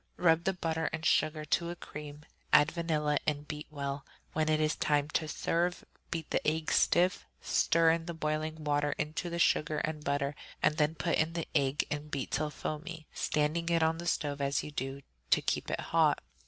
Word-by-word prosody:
Rub 165 -1 +3
the 190 - +2
butter 165 -2 -1
and 160 0 -4
sugar 155 -1 +2
to 170 +3 +1
a 175 - -4
cream; 150 -2 -9 0.3
add 150 +2 +6
vanilla 155 -4 0
and 145 -1 -1
beat 150 0 -6
well. 140 -2 -4 0.3
When 155 0 +1
it 155 0 +3
is 155 0 +2
time 145 -1 +1
to 155 0 0
serve, 175 +3 -1 0.2
beat 165 -2 -4
the - - +2
egg 155 +1 0
stiff, 180 +1 +3
stir 165 0 +3
the 165 0 -6
boiling 155 0 -2
water 145 0 +1
into 155 +3 -3
the 170 - -3
sugar 155 -2 +2
and 155 -1 -2
butter, 140 0 0 0.3
and 155 - +2
then 155 0 +2
put 170 +1 0
in 160 +1 +1
the 165 -1 -3
egg 140 -1 +2
and 150 0 -3
beat 140 -2 -3
till 150 +2 0
foamy, 155 +2 -5
standing 155 +3 0
it 165 -1 +3
on 160 +1 +2
the 170 - -5
stove 145 -4 -1
as 140 0 +1
you 150 - -7
do 135 0 -4
so, - - -37 0.2
to - - +4
keep - - -1
it - - -1
hot. - - +2
155 Hz, 200 wpm, -31 LUFS, 150-165 Hz, 0.3 s, add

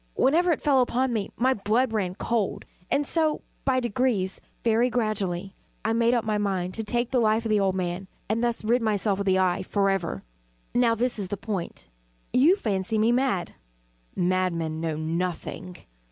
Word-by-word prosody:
Whenever 340 +6 +3
it 320 - -1
fell 275 -3 +4
upon 250 +1 +1
me, 210 -3 -1
my 260 +2 +3
blood 225 +3 +1
ran 185 -4 -1
cold; 220 0 -1 0.2
and 290 - +1
so 315 0 +1 0.2
by 260 -1 +3
degrees 235 -5 0 0.2
very 235 +2 +3
gradually 200 -6 -2 0.3
I 225 - +2
made 235 +1 +3
up 235 - 0
my 215 -1 0
mind 185 -3 -1
to 225 - -4
take 240 +3 -1
the 255 - +3
life 220 0 +2
of 220 - -1
the 210 - +4
old 190 -1 +1
man, 180 +1 -3 0.2
and 225 +3 0
thus 235 -2 -1
rid 240 +3 +2
myself 210 -2 0
of 200 - -2
the 190 0 +4
eye 185 -1 +2
forever. 195 -3 0 0.5
Now 240 -2 +3
this 240 0 -1
is 195 - -2
the 205 - -4
point. 195 -4 -5 0.5
You 285 +9 +6
fancy 210 - -1
me 220 +2 +3
mad. 245 -7 0 0.6
Madmen 175 -3 0
know 160 -2 -1
nothing. 175 +2 -3
215 Hz, 180 wpm, -26 LUFS, 190-240 Hz, 0.6 s, You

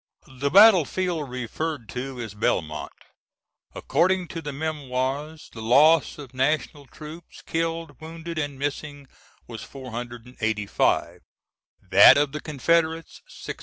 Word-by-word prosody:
] - - -33
[The 130 +2 -3
battlefield 180 - +4
referred 130 +2 -4
to 130 +3 -6
is 110 -4 -6
Belmont. 80 -7 -2 0.8
According 185 0 +1
to 165 - -6
the 145 -2 -5
Memoirs, 145 0 -4
the 115 - -8
loss 145 +8 +4
of 140 -4 -11
national 145 +1 -1
troops, 155 +4 -12
killed, 165 -3 -3
wounded, 165 +1 -7
and 145 -3 -4
missing, 145 0 -5 0.4
was 115 -2 -9
485; 120 -4 -3 0.7
that 135 - +9
of 145 -1 +1
the 150 - -5
Confederates, 160 +2 -1
642. - - -9
145 Hz, 120 wpm, -24 LUFS, 125-160 Hz, 0.8 s, that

